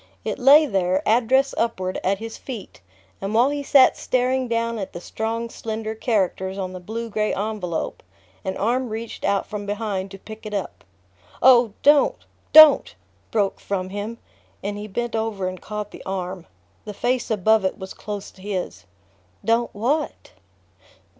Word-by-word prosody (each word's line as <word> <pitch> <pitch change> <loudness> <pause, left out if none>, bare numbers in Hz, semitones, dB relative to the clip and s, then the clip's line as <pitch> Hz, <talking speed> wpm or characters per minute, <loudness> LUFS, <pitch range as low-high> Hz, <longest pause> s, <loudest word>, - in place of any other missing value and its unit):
It - - -3
lay 285 +4 +7
there, 190 -5 0
address 255 +4 +3
upward, 185 -5 -1
at 195 +1 +1
his 225 +2 -7
feet, 225 - -9 0.4
and 200 +2 -3
while 245 +5 +4
he 290 0 -2
sat 275 -1 +5
staring 255 0 0
down 230 -1 -1
at 195 - -5
the - - -6
strong 225 +5 -3
slender 220 -1 -5
characters 195 -4 -1
on 185 -1 -4
the 185 - -6
blue 225 +6 -5
gray 215 -1 -1
envelope 200 -5 -3 0.4
an 190 - -3
arm 245 +4 0
reached 225 +1 -6
out 200 0 +1
from 205 -1 -6
behind 205 -2 -2
to 195 - -10
pick 215 +3 -11
it 210 - -4
up. 195 - -5 0.6
"Oh, 245 -4 +6
don't 290 0 +5 0.3
DON'T" 310 -1 +8 0.3
broke 205 -3 0
from 185 -2 -3
him, 205 +4 -5 0.5
and 205 +1 -3
he 205 +1 -6
bent 235 +3 -3
over 220 -4 -1
and 185 0 -6
caught 210 0 -5
the - - -11
arm. 185 -2 -5 0.4
The 210 -1 -8
face 250 +3 0
above 220 0 +3
it 190 - -1
was 190 0 -8
close 205 -1 -6
to 185 - -18
his. 190 - -4 0.6
"Don't 230 +1 +2
what?" 270 +9 -2
215 Hz, 165 wpm, -23 LUFS, 195-235 Hz, 0.6 s, DON'T